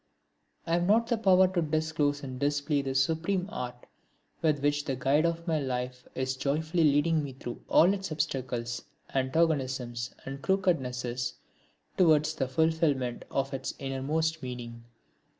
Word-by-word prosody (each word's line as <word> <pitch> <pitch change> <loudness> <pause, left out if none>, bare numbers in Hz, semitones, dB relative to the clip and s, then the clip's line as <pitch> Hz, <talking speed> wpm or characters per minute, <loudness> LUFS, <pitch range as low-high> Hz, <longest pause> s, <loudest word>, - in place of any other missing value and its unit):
I 165 - -1
have 175 +1 +2
not 225 +3 +4
the 235 - +1
power 190 -3 +6
to 185 -2 0
disclose 155 -2 0
and 130 -2 -6
display 145 +1 +1
the 135 -1 -3
supreme 165 +7 +1
art 125 0 -6 0.6
with 155 -2 +3
which 145 0 +2
the 135 - -1
Guide 140 +6 +2
of 170 0 -3
my 160 -2 +1
life 125 -2 -3
is 130 0 -1
joyfully 155 +5 +1
leading 150 +2 +3
me 140 -2 -6
through 120 -2 -7
all 180 +4 +6
its 195 -3 -4
obstacles, 125 -6 -2 0.3
antagonisms 130 -4 0
and 135 +1 -6
crookednesses 125 -10 0 0.6
towards 155 -3 +4
the 135 - -1
fulfilment 145 -3 +1
of 135 0 -1
its 135 0 -4
innermost 155 +4 -1
meaning. 120 -2 -7
145 Hz, 145 wpm, -29 LUFS, 130-160 Hz, 0.6 s, power